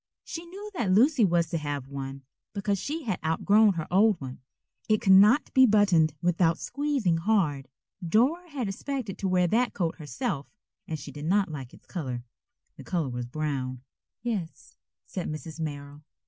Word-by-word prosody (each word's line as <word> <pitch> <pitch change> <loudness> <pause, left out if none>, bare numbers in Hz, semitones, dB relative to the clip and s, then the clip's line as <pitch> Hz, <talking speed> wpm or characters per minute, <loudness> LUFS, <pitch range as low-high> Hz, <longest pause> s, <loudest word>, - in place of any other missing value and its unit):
She 335 +1 -7
knew 405 +4 -9
that 235 - -1
Lucy 250 +6 +5
was 170 -4 +2
to 165 - 0
have 145 -3 -4
one, 135 0 -6 0.3
because 200 -1 -1
she 305 - -4
had 210 -8 -2
outgrown 200 +6 +4
her 160 -3 -3
old 200 0 +4
one. 130 -2 -8 0.5
It 215 -1 +4
could 190 - +5
not 210 +9 +6
be 260 -1 +7
buttoned 185 -8 +4
without 170 -1 +2
squeezing 275 - 0
hard. 165 -8 +1 0.4
Dora 265 - +2
had 270 -7 -3
expected 220 +1 -4
to 195 - -1
wear 180 -1 +3
that 240 +4 +1
coat 170 -4 -1
herself, 145 -1 -4 0.4
and 160 - -3
she 145 0 -9
did 145 +2 -7
not 195 +2 +2
like 135 -4 -7
its - - -18
color. 130 -9 -5 0.5
The - - -10
color 170 -7 -1
was 120 -1 -4
brown. 130 -3 -3 0.4
"Yes," 165 - -4 0.3
said 185 - -5
Mrs. 155 +1 -7
Merrill. 145 -2 -6
175 Hz, 170 wpm, -27 LUFS, 145-215 Hz, 0.5 s, be